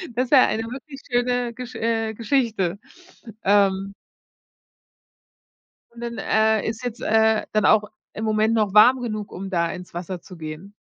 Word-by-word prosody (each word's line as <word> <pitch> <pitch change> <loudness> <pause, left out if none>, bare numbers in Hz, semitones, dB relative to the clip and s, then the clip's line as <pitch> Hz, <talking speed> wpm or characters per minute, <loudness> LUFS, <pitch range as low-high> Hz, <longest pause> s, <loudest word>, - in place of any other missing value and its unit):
Das 255 - +1
ist 255 - -15
ja 265 -3 +7
eine 220 +1 -2
wirklich 270 +4 -9
schöne 245 0 0
Gesch 250 +1 -9
äh, 225 -1 -1
Geschichte, 220 -6 0 0.6
ähm 195 0 +2 2.0
Und 235 0 -13
dann, 235 -1 -5
äh, 220 -1 +2
ist 225 +2 -4
jetzt, 245 -1 -5
äh, 220 0 +2
dann 215 -1 +1
auch 215 -1 +5 0.3
im 220 - -4
Moment 215 +1 +2
noch 210 -3 +1
warm 245 +4 +6
genug, 215 -3 -4
um 195 +2 -6
da 170 -3 0
ins 180 -2 -9
Wasser 175 +1 -6
zu 180 - -13
gehen? 160 +5 -8
220 Hz, 160 wpm, -23 LUFS, 195-240 Hz, 2.0 s, ja